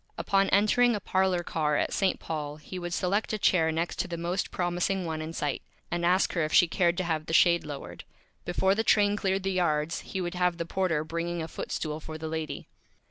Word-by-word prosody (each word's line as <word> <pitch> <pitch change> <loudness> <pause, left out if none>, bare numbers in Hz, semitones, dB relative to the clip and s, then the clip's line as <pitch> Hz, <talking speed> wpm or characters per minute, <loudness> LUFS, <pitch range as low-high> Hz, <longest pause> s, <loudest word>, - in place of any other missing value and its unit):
Upon 195 0 +2
entering 220 +4 +4
a - - -2
Parlor 185 -2 +1
Car 150 -3 0
at - - 0
St. 195 -2 +1
Paul 150 -2 -4
he 155 +5 -8
would 175 0 -5
select 195 +5 0
a - - 0
Chair 165 -5 +3
next 165 +2 -2
to - - 0
the 170 - -5
Most 175 +3 -2
Promising 180 +1 -1
One 160 -1 -3
in 155 +1 -5
Sight, 150 -4 -2 0.3
and 175 0 -1
ask 180 +2 +3
her 170 - +1
if 155 - -2
she 175 - +6
cared 175 +1 +1
to 185 - 0
have 160 -3 -2
the 165 - -4
Shade 170 +1 +5
lowered. 135 - -8 0.4
Before 190 +2 +1
the 220 +2 0
Train 205 -2 +4
cleared 195 -1 0
the 195 - 0
Yards 165 -4 0
he 190 - -6
would 175 -1 -3
have 180 -1 +1
the 170 - -3
Porter 170 -4 0
bringing 170 +1 -3
a - - -5
Foot - - -7
Stool 155 -1 -3
for 155 0 -7
the 160 0 -5
Lady. 160 -1 -4
175 Hz, 230 wpm, -28 LUFS, 160-190 Hz, 0.4 s, she